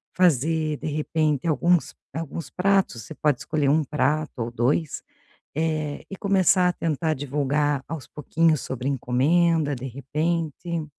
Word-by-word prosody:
fazer 160 -2 +2
de - - -6
repente 155 -1 0
alguns 170 +2 +2 0.2
alguns 165 0 -5
pratos, 190 -10 +1
você 160 - -9
pode 150 -4 +1
escolher 150 -3 0
um 155 +2 +3
prato 150 +2 0
ou 115 - -2
2, 130 +6 0 0.5
eh, 155 -2 -1
e 195 - -7
começar 190 -2 +3
a 180 - -1
tentar 160 0 -1
divulgar 145 +1 0
aos 160 -6 -6
pouquinhos 155 +1 +1
sobre 130 +1 -3
encomenda, 145 +4 +2
de 125 +1 -7
repente. 155 +5 -2
155 Hz, 135 wpm, -24 LUFS, 140-165 Hz, 0.5 s, um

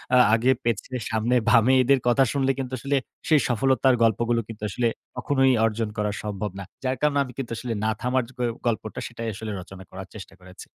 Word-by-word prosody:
আ - - +7 0.2
আগে 120 +3 +4
পেছনে 115 +2 -2 0.2
সামনে 115 +2 +1
বামে 115 +4 +5
এদের 135 +1 +4
কথা 135 +3 +5
শুনলে 135 -1 +2
কিন্তু 130 -1 -4
আসলে 140 +2 -1 0.3
সেই 155 -2 +5
সফলতার 130 +2 +3
গল্পগুলো 115 +1 +2
কিন্তু 110 -2 -9
আসলে 120 +5 0 0.3
কখনোই 135 0 +3
অর্জন 110 0 -1
করা 105 0 0
সম্ভব 105 -1 -3
না। - - -5 0.2
যার 130 0 -1
কারণে 145 -1 +2
আমি 125 -2 -10
কিন্তু 130 -4 -5
আসলে 120 -2 -3
না 110 - +2
থামার 125 0 +1
গ - - -23 0.3
গল্পটা 110 -1 -2
সেটাই 115 -1 -6
আসলে 110 +2 -6
রচনা 95 +1 -10
করার 95 0 -9
চেষ্টা 95 -2 -10
করেছি। 90 +1 -13
120 Hz, 195 wpm, -25 LUFS, 110-130 Hz, 0.3 s, আ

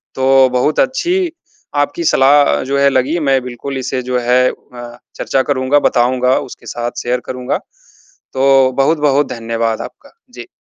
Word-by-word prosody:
तो 130 0 +4
बहुत 125 +4 0
अच्छी 350 +6 0 0.5
आपकी 145 +4 -5
सलाह 145 -1 +4
अ, - - 0
जो 135 +2 -2
है 140 - +4
लगी 140 +6 0
मैं 135 -3 +1
बिल्कुल 125 +2 -6
इसे 130 0 -3
जो 125 - +1
है 125 +1 +2
अ, 120 -1 -12 0.2
चर्चा 135 - 0
करूँगा 130 +1 +2
बताऊँगा 125 +1 +1
उसके 135 -4 -10
साथ 120 0 -5
शेयर 125 +1 -1
करूँगा। 125 -1 -3 0.7
तो 135 -1 +3
बहुत-बहुत 145 0 +2
धन्यवाद 115 -1 -3
आपका। - - -11 0.2
जी। - - -10
130 Hz, 155 wpm, -15 LUFS, 125-140 Hz, 0.7 s, तो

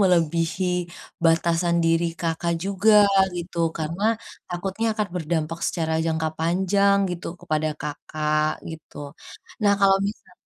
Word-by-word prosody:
melebihi 170 -1 +2 0.6
batasan 170 +1 +3
diri 165 +1 +3 0.2
Kakak, 170 0 -1
juga 200 +2 +3 0.4
gitu. 175 0 -7 0.2
Karena 165 +4 -4 0.5
takutnya 190 +5 -3
akan 210 -2 -2
berdampak 165 -1 -2
secara 160 -2 -1
jangka 160 -1 0
panjang 190 +4 +2
gitu 175 -1 -5
kepada 155 0 -1
Kakak 155 +1 -1 0.2
gitu. 160 -2 -11 0.7
Nah, 200 -1 +5
kalau 195 -1 +6
misal 210 - -10
170 Hz, 115 wpm, -24 LUFS, 160-190 Hz, 0.7 s, kalau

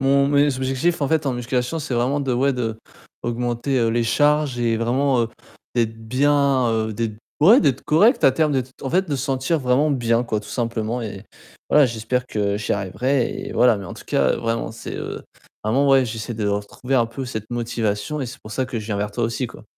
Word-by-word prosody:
Mon 140 +1 +3
mes 145 -2 +3
objectifs 135 +6 0
en 140 - +1
fait, 160 -1 +1
en 135 - +1
musculation 125 +5 -2
c'est 135 - -3
vraiment 130 +5 +1
de, 135 -2 -1
ouais, 135 +3 +2
d'augmenter, 120 +2 -3
heu, 115 - +2
les 115 +1 +1
charges 145 +2 +2
et 115 -1 +1
vraiment, 125 +2 +1
heu, 115 - -2 0.5
d'être 115 -2 0
bien, 140 0 +3
heu, 110 -1 -1
d'être 110 -1 -3 0.2
ouais 205 - +7
d'être 140 -7 +1
correct 210 - +4
à - - +7
terme 155 +2 +1
d'être, 130 -2 -1
en 135 - -3
fait 185 +2 +1
de 145 - 0
se 130 - -3
sentir 135 +4 0
vraiment 135 +3 +2
bien 120 -3 +1
quoi 110 -3 -2
tout 105 0 -10
simplement 115 0 -2
et 100 -2 -7 0.4
voilà 150 -2 +6
j'espère 120 +2 -2
que 100 -1 -1
j'y 105 - -2
arriverai 120 +7 -1
et - - -7
voilà 120 -3 +4
mais 100 - -7
en 90 - -8
tout - - -12
cas - - +2
vraiment 115 -1 -2
c'est, 115 - -8
heu, - - -5 0.4
vraiment 135 +4 +4
j'essaie 115 +1 -5
de 105 -1 -2
retrouver 105 +6 -2
un 120 -3 +3
peu 130 +4 -6
cette 110 -3 -6
motivation 115 +3 -2
et 130 - -2
c'est 135 +4 -9
pour 110 - -10
ça 130 - 0
que 125 -2 -4
je 105 - -7
viens 105 -2 -2
vers 105 +1 -2
toi 120 +3 -1
aussi, 115 +3 -2
quoi. - - -13
125 Hz, 220 wpm, -22 LUFS, 115-140 Hz, 0.5 s, ouais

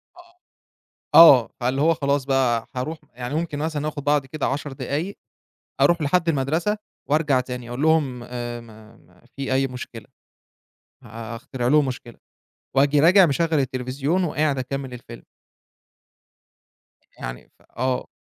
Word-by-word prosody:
آه، 355 0 -19 0.8
آه، 140 -8 +9
فاللي 130 +2 0
هو 165 +3 +4
خلاص 140 -2 0
بقى 130 -4 +1
هارُوح 155 +6 -3 0.2
يعني 125 +3 -5
ممكن 160 -2 -2
مثلًا 155 -1 -2
آخد 145 -2 -6
بعضي 145 -2 +1
كده 155 +1 -3
10 145 +1 -3
دقايق، 155 +8 -4 0.6
أرُوح 175 -1 +4
لحد 170 +3 +1
المدرسة 160 +8 0 0.3
وارجع 150 -3 +2
تاني 125 -1 -6
أقول 125 +3 -5
لهم 150 -6 +1
آآ 120 -1 -6
ما 110 -1 -16
ما 90 +1 -25
في 135 -1 -3
أي 135 +1 +2
مشكلة، 125 -3 -9 1.0
ه - - -13
هـأخترع 115 +3 -6
لهم 150 0 +4
مشكلة 120 -2 -7 0.6
وآجي 140 +2 +4
راجع 180 +4 +7
مشغل 165 +2 0
التليفزيون 135 +5 -1
وقاعد 150 -4 0
أكمل 135 0 -4
الفيلم. 120 - -11 2.0
يعني - - -7
ف - - -25
آه. 130 +1 -1
135 Hz, 140 wpm, -23 LUFS, 125-155 Hz, 2.0 s, آه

